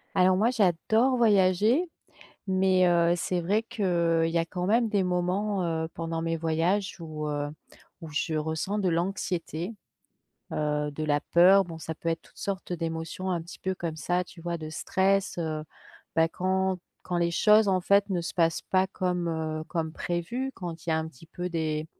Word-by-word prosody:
Alors 185 0 +5
moi, 220 +5 +3
j'adore 220 +4 +2
voyager. 215 - +3 0.6
Mais, 190 -1 +3
heu, 170 0 +4
c'est 175 +1 -1
vrai 205 +6 +1
qu'il 170 -6 +1
y 165 - 0
a 165 - +1
quand 180 +1 -4
même 230 +3 +3
des 200 -2 +2
moments, 185 +2 0 0.2
heu, - - -2
pendant 165 0 -3
mes 165 0 -1
voyages 170 +5 0
où, 155 -2 -5
heu, 145 0 -2 0.5
où 165 - -8
je 150 +2 -1
ressens 160 +6 -1
de 190 -3 +1
l'anxiété. 175 +1 -2 0.8
Heu, 150 -1 -1
de 155 +2 -4
la 145 -1 +1
peur. 185 +4 +6
Bon 170 -3 -8
ça 160 0 -5
peut 165 - -3
être 165 - -2
toute - - -23
sorte 195 -2 -4
d'émotion, 165 +2 -4
un 175 -2 -1
petit 170 +2 -11
peu 190 - -1
comme 170 -3 -4
ça, 175 +4 0
tu 175 -1 -14
vois, 170 0 -3
de 155 -1 -7
stress. 190 +5 0
Heu, 155 -2 -2 0.5
bah, 165 0 +4
quand 190 +2 0 0.3
quand 180 -1 -2
les 170 0 +1
choses, 210 +4 +5
en 185 -1 +2
fait, 200 +2 +3
ne 180 -3 0
se 170 - -5
passent 165 -2 +2
pas 190 0 +1
comme, 180 -2 -1
heu, 160 -1 -2
comme 160 -2 -2
prévues. 175 +12 -3
Quand 170 -3 -7
il - - -3
y - - +3
a - - +2
un 160 0 -2
petit 160 0 -15
peu 175 +2 -5
des, 155 -2 -1
175 Hz, 190 wpm, -27 LUFS, 165-190 Hz, 0.8 s, peur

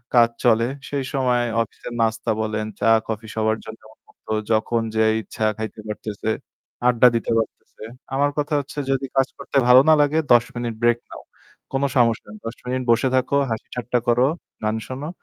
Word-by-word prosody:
কাজ 115 -1 +6
চলে, 115 -1 +4 0.2
সেই 140 -2 -2
সময় 125 -3 +2 0.2
অফিসের 115 +1 -7
নাস্তা 115 0 0
বলেন, 110 0 -2
চা, 115 - +2 0.2
কফি 110 0 -4
সবার 110 0 +1
জন্য 110 0 -10
উন্মুক্ত। - - -29 0.3
যখন 115 +1 +1
যে 110 - +3 0.2
ইচ্ছা 110 +2 -4
খাইতে 110 0 -6
পারতেছে, 105 0 -4 0.6
আড্ডা 125 0 +6
দিতে 115 - -1
পারতেছে। 110 -1 -5 0.3
আমার 145 +1 +2
কথা 150 +1 -1
হচ্ছে 140 +1 -6
যদি 135 0 0
কাজ 135 -1 +3
করতে 140 0 -3
ভালো 125 +1 +9
না 155 - +8
লাগে 150 +2 +2
১০ 115 -1 +5
মিনিট 120 -1 -3
break 120 0 +4
নাও, - - -9 0.5
কোন 135 +1 0
সমস্যা 115 -3 +2
নাই। 105 - -10
১০ 115 - -5
মিনিট 130 +1 -2
বসে 130 +3 +3
থাকো, 135 +2 +2
হাসিঠাট্টা 120 +2 -2
করো, 120 +2 +4 0.4
গান 110 +1 0
শোনো 135 +4 -5
120 Hz, 175 wpm, -22 LUFS, 110-130 Hz, 0.6 s, ভালো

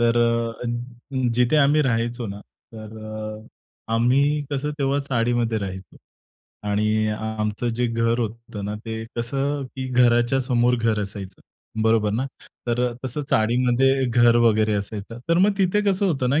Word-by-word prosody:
तर 120 0 +3 0.5
अ, - - -4 0.7
जिथे 125 +5 +3
आम्ही 150 +1 +4
राहायचो 120 -1 -1
ना, 100 +1 -7
तर 110 0 -13
अ, 110 +1 -8
आम्ही 140 +6 +3
कसं 145 +1 -1
तेव्हा 140 0 +1
चाळीमध्ये 120 -4 0
राहायचो 95 -3 -7 0.7
आणि 105 +1 +1
आमचं 110 +1 -2
जे 125 +1 +1
घर 115 0 0
होतं 115 -2 -4
ना, 105 +1 -3
ते 110 0 -4
कसं 135 +4 -1
की 130 - -3
घराच्या 120 +1 +3
समोर 125 -1 +2
घर 115 -2 +1
असायचं, 100 -1 -7 0.4
बरोबर 110 -2 +3
ना. 130 +5 -1 0.4
तर 120 +1 0
अ, - - -5
तसं 130 +3 -3
चाळीमध्ये 125 +4 +3
घर 120 -1 +4
वगैरे 110 -1 +3
असायचं. 105 +2 -5
तर 170 +1 +3
मग 200 +2 +4
तिथे 195 +2 +2
कसं 195 +1 +1
होतं 135 -7 0
ना, 145 +3 +3
120 Hz, 150 wpm, -23 LUFS, 110-130 Hz, 0.7 s, आम्ही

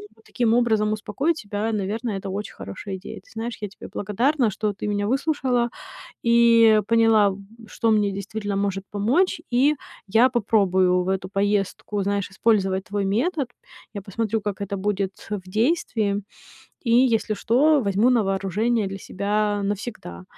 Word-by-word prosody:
но 225 - -24
таким 235 -2 +1
образом 220 -3 +2
успокоить 275 +10 -1
себя, 205 0 -3
наверное, 210 +1 -2
это 195 +1 -4
очень 210 - -7
хорошая 195 0 -7
идея. 190 - -9
Ты - - -24
знаешь, 225 +1 -5
я 210 - -4
тебе 195 - -12
благодарна, 235 +5 +1
что 210 +1 -2
ты 210 - -5
меня 205 0 -1
выслушала 260 -2 0 0.6
и 230 -2 +6
поняла, 225 -4 +4 0.3
что 230 - 0
мне 210 -1 +2
действительно 200 +1 -4
может 195 -1 -1
помочь, 265 - +1
и 275 +5 +3 0.3
я 225 +6 +5
попробую 190 -6 +2
в - - -4
эту 190 -1 -2
поездку, 200 +1 -1
знаешь, 200 0 -1
использовать 190 -2 +1
твой 200 0 -2
метод. 260 - 0 0.5
Я 200 - -5
посмотрю, 220 +3 -2
как 205 -2 -4
это 200 0 -3
будет 195 -1 -1 0.2
в 185 -3 -5
действии, 215 - 0 0.6
и, 235 - -2
если 235 -3 +3
что, 280 +8 +3
возьму 200 +3 +2
на 240 -3 +3
вооружение 200 +3 0
для 195 0 -5
себя 205 +1 -1
навсегда. 200 - -5
210 Hz, 155 wpm, -23 LUFS, 200-235 Hz, 0.6 s, и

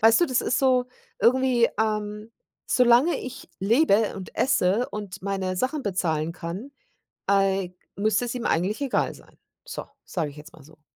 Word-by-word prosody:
Weißt 225 +7 +6
du, 345 - +4
das 255 -3 +1
ist 250 - 0
so 255 -2 +3 0.3
irgendwie, 250 -1 +4
ähm, 210 0 -2 0.4
solange 250 +6 +4
ich 260 +2 -8
lebe 220 0 +3
und 190 -2 -8
esse 220 -2 +2
und 200 -2 -7
meine 190 -1 -2
Sachen 265 +7 -1
bezahlen 165 -6 -1
kann, 175 +10 -6 0.6
äh, 195 -2 +2 0.3
müsste 215 +3 +1
es 240 - -4
ihm 245 - -4
eigentlich 185 +6 +1
egal 270 -3 0
sein. - - -18 0.3
So, - - -6 0.2
sage 165 -6 -2
ich 145 - -14
jetzt 155 +2 -12
mal 155 - -15
so. 155 +1 -19
210 Hz, 165 wpm, -25 LUFS, 185-250 Hz, 0.6 s, Weißt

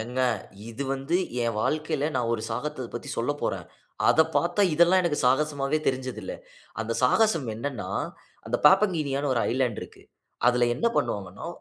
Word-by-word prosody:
ஏங்க, 125 +3 -3 0.5
இது 115 +5 -5
வந்து 135 +6 0 0.3
என் 115 -2 -1
வாழ்க்கையில 155 +1 -1
நான் 120 -2 0
ஒரு 110 - -4
சாகசத்த 130 +2 -3
பத்தி - - -6
சொல்லப்போறேன். - - -2 0.4
அத 160 - +5 0.2
பாத்தா, 175 +7 +2
இதெல்லாம் 175 +3 +5
எனக்கு 160 -4 0
சாகசமாவே 145 +2 +1
தெரிஞ்சது 130 -4 -1
இல்ல. 95 - -5 0.5
அந்த 110 +1 -2
சாகசம் 165 - +3
என்னன்னா, 120 -1 -4 0.6
அந்த 120 +2 0
பாப்பங்கினியான்னு 155 -8 +3
ஒரு 115 - +1
ஐலேண்ட் 125 -2 0
இருக்கு. - - -12 0.4
அதில 125 0 +4
என்ன 230 - 0
பண்ணுவாங்கன்னா, 100 - -2
135 Hz, 145 wpm, -26 LUFS, 120-155 Hz, 0.6 s, அத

